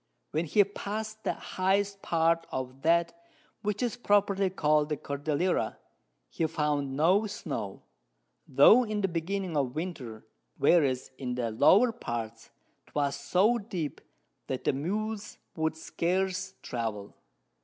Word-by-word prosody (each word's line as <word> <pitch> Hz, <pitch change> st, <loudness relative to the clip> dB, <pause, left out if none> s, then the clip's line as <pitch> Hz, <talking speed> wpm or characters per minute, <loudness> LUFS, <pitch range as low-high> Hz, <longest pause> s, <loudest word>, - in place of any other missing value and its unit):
When 160 Hz, +3 st, 0 dB
he 205 Hz, +6 st, +5 dB
pass'd 215 Hz, +2 st, -5 dB
the -, -, 0 dB
highest 195 Hz, +1 st, 0 dB
Part 165 Hz, 0 st, +1 dB
of 130 Hz, 0 st, -5 dB
that 170 Hz, +2 st, +3 dB, 0.5 s
which 210 Hz, +1 st, -1 dB
is 245 Hz, 0 st, -1 dB
properly 200 Hz, -3 st, +2 dB
call'd 150 Hz, -4 st, +2 dB
the 150 Hz, -, -1 dB
Cordillera, 145 Hz, +6 st, -1 dB, 0.5 s
he 165 Hz, -, -1 dB
found 145 Hz, -3 st, -1 dB
no 185 Hz, +8 st, +4 dB
Snow, -, -, -5 dB, 0.6 s
tho' 250 Hz, +3 st, +7 dB
in 215 Hz, -2 st, -2 dB
the 195 Hz, -, +2 dB
beginning 175 Hz, +1 st, -3 dB
of 135 Hz, -3 st, 0 dB
Winter, 135 Hz, -11 st, -5 dB, 0.3 s
whereas, 140 Hz, -5 st, +3 dB
in 125 Hz, -2 st, -3 dB
the 120 Hz, -2 st, -1 dB
lower 195 Hz, -, +5 dB
Parts, 115 Hz, -, -6 dB, 0.4 s
'twas 140 Hz, -1 st, -1 dB
so 185 Hz, +12 st, +2 dB
deep, 185 Hz, -8 st, -5 dB, 0.5 s
that 130 Hz, -, -3 dB
the -, -, +2 dB
Mules 210 Hz, +8 st, -3 dB, 0.2 s
could 160 Hz, -1 st, -1 dB
scarce 185 Hz, +3 st, -1 dB
travel. 110 Hz, -4 st, -4 dB
165 Hz, 130 wpm, -29 LUFS, 140-200 Hz, 0.6 s, tho